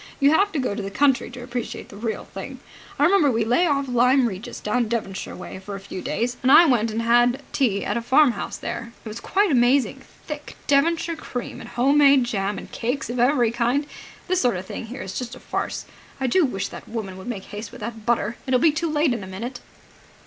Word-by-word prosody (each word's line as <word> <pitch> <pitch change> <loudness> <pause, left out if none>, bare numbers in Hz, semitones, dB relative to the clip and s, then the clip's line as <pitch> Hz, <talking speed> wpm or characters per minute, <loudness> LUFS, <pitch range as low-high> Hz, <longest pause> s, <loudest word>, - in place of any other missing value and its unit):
"You 280 +1 +5
have 400 +6 +3
to - - -1
go 255 -6 -1
to 210 - -4
the 195 - -4
country 265 +3 +2
to 245 0 -9
appreciate 245 -1 -5
the - - -11
real 220 +1 -3
thing. - - -8 0.4
I - - +2
remember 350 -6 +5
we 225 -3 +1
lay 250 +10 +3
off 280 -2 +1
Lyme 250 +2 +4
Regis 195 0 -6
down 235 +2 0
Devonshire 215 -4 -3
way, 185 - -8
for 200 +1 -7
a - - -6
few 190 -1 -7
days, 245 +2 -2
and 260 0 +3
I 340 - +9
went 235 -6 +2
and 225 +1 -2
had 240 +3 +3
tea 210 -8 +1
at 205 - -1
a - - -1
farmhouse 260 -1 +2
there. 235 0 -5
It - - -6
was 215 +1 -6
quite 395 - +1
amazing! 255 +1 +3 0.2
Thick 300 -1 -7
Devonshire 330 +4 +2
cream 245 -5 -6
and - - -9
home 275 +4 +3
made 280 -2 +6
jam 205 -3 -2
and - - -9
cakes 245 0 -2
of 245 - -3
every 245 -2 +3
kind. 240 +5 +1 0.4
This 370 0 +2
sort 245 -7 +2
of 185 - -6
thing 225 - -6
here 245 0 -6
is 190 0 -4
just 245 -1 -6
a - - -12
farce. - - -3 0.3
I 265 - -1
do 315 +7 +3
wish 200 -6 -3
that - - -10
woman 215 -5 -5
would 190 - -10
make 215 -6 -4
haste 205 +1 -6
with - - -12
that 225 0 -6
butter. 235 0 0
It'll 255 -1 +3
be 320 +4 +5
too 320 +2 -2
late 300 -3 +2
in 230 -4 -4
a - - -8
minute." 230 +7 -6
245 Hz, 235 wpm, -23 LUFS, 220-280 Hz, 0.4 s, I